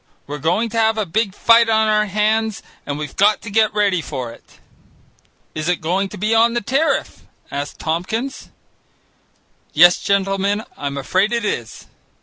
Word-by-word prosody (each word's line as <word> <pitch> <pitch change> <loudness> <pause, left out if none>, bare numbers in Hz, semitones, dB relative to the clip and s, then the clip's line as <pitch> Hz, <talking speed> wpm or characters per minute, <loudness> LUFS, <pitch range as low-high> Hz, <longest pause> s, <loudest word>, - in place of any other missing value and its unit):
We're 145 +1 -6
going 175 +10 0
to 230 +1 -2
have 220 0 +2
a 215 - 0
big 200 +2 -1
fight 230 0 +5
on 220 0 +3
our 210 0 +2
hands 215 +1 0 0.2
and 145 0 -3
we've 150 -2 -6
got 210 +2 +3
to 210 - -7
get 220 +1 +3
ready 200 -4 +2
for 130 -6 -5
it." 115 - -18 0.9
"Is 155 +2 -3
it 180 - 0
going 185 +5 -1
to - - -9
be 215 +4 0
on 230 +1 +3
the 240 - 0
tariff?" 275 +9 -1 0.2
asked 145 +1 -5
Tompkins. 220 +12 -3 1.2
"Yes, 175 +3 +6
gentlemen, 200 +1 0
I'm 140 -1 -5
afraid 185 - +1
it 235 -2 -1
is. 120 - -4
205 Hz, 165 wpm, -19 LUFS, 165-220 Hz, 1.2 s, Yes